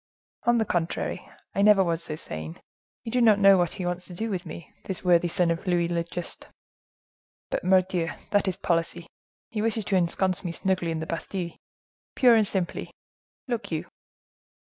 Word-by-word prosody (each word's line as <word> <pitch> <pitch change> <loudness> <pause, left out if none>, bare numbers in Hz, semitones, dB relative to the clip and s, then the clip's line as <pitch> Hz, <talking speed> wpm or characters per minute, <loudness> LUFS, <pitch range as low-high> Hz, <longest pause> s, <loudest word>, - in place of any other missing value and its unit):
"On 240 0 +5
the 220 - +2
contrary, 175 -3 -2 0.2
I 200 - +1
never 205 -1 +6
was 170 -2 -1
so 155 - -4
sane. 80 - -6 0.4
You 230 - -5
do 250 +1 +2
not 220 -3 +6
know 195 -1 +7
what 175 -1 +1
he 185 - -5
wants 180 0 -3
to 180 - -9
do 220 +4 -2
with 180 -3 -3
me, 170 - -9
this 190 -1 -4
worthy 175 -1 +4
son 170 0 +2
of 170 +4 -4
Louis 175 -1 +2
le 170 -1 0
Juste!—But, 170 +1 -9
mordioux! 185 -2 +2 0.2
that 205 -1 +2
is 185 - 0
policy. 170 0 -1 0.5
He 215 - -2
wishes 220 -1 0
to 195 - 0
ensconce 185 +1 +1
me 175 -2 -3
snugly 185 -1 0
in 160 -1 -2
the - - -3
Bastile—purely 185 +7 -1
and 210 - +2
simply, 185 -3 -2 0.6
look 240 -6 -3
you!" 160 -1 -2
180 Hz, 175 wpm, -26 LUFS, 170-200 Hz, 0.6 s, know